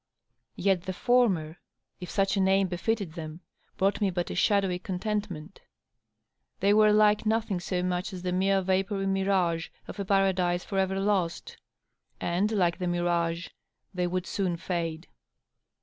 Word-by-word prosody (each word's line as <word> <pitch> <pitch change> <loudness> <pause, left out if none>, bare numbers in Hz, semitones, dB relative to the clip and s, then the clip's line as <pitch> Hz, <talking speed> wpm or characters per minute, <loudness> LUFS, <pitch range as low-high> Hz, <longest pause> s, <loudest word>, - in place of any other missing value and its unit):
Yet 190 -3 +1
the 185 - -3
former^ 185 -9 +2 0.4
if 180 - -7
such 195 0 +1
a - - +1
name 190 0 +3
befitted 190 0 -2
them, 160 0 -7 0.4
brought 200 +2 +1
me 200 - +3
but 175 -1 -2
a - - -4
shadowy 195 -3 +2
contentment. 190 -3 -4 1.0
They 200 +2 +4
were 215 0 +6
like 210 0 +4
nothing 220 -4 0
so 180 +1 -2
much 180 +3 -2
as 180 -2 -7
the 180 - -1
mere 190 +1 +2
vapory 195 +1 0
mirage 190 -4 +1 0.2
of - - -8
a 200 - -2
paradise 185 -2 +2
for 195 - -2
ever 190 0 0
lost! 200 - -1 0.6
And, 185 +5 0
like 180 -4 +1
the 180 - -2
mirage, 175 -1 0 0.4
they 180 -1 0
would 180 +1 -2
soon 185 -4 -1
^e. 165 -2 -3
190 Hz, 150 wpm, -28 LUFS, 175-200 Hz, 1.0 s, were